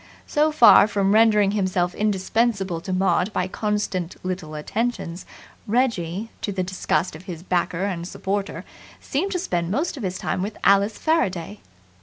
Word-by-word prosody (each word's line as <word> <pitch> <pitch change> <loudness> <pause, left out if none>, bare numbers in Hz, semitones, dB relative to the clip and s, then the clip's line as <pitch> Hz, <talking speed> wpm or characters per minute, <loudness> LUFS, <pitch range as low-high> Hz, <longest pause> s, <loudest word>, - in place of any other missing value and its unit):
So 305 +1 +2
far 240 -7 +7
from 200 -1 +1
rendering 210 -2 +5
himself 185 -3 0
indispensable 200 -3 0
to 185 - -6
Maud 190 +2 +1
by 180 - 0
constant 195 -4 -2
little 180 -4 -4
attentions, 185 +1 -3 0.4
Reggie, 215 -4 0
to 205 - -2
the 190 -1 -1
disgust 180 -3 -1
of 170 +4 -12
his 170 -3 -7
backer 180 0 -1
and 175 -4 -3
supporter, 200 +2 -3 0.3
seemed 360 +9 -2
to - - 0
spend 175 - -2
most 290 - -1
of - - -6
his 185 -3 -3
time - - -2
with 205 +3 -4
Alice 200 +2 +4
Faraday. 205 - -1
195 Hz, 155 wpm, -23 LUFS, 180-220 Hz, 0.4 s, far